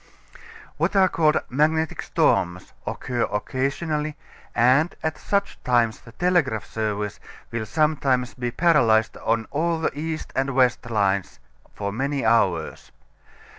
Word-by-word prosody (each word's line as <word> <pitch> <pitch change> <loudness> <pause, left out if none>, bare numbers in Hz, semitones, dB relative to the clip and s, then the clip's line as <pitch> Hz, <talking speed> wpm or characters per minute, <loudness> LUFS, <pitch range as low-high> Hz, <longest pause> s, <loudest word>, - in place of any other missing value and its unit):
What - - 0
are 190 -1 +6
called 155 -4 +2
magnetic 155 +4 +1
storms 90 0 0
occur 125 -2 -3
occasionally, 150 +7 -2 0.4
and 130 +8 +3
at 160 0 -2
such 200 0 -2
times 120 -3 +2
the 115 - -14
telegraph 165 - +1
service 105 -2 -3 0.3
will 115 -2 -3
sometimes 135 -3 +1
be 120 -1 -3
paralyzed 120 -8 +3
on 115 -1 0
all 165 +2 0
the 160 - 0
east 155 +1 -4
and 135 0 0
west 125 -2 +2
lines 100 -4 0 0.4
for 100 -1 -3
many 135 +4 -2
hours. 95 -8 +1
130 Hz, 125 wpm, -24 LUFS, 110-155 Hz, 0.4 s, are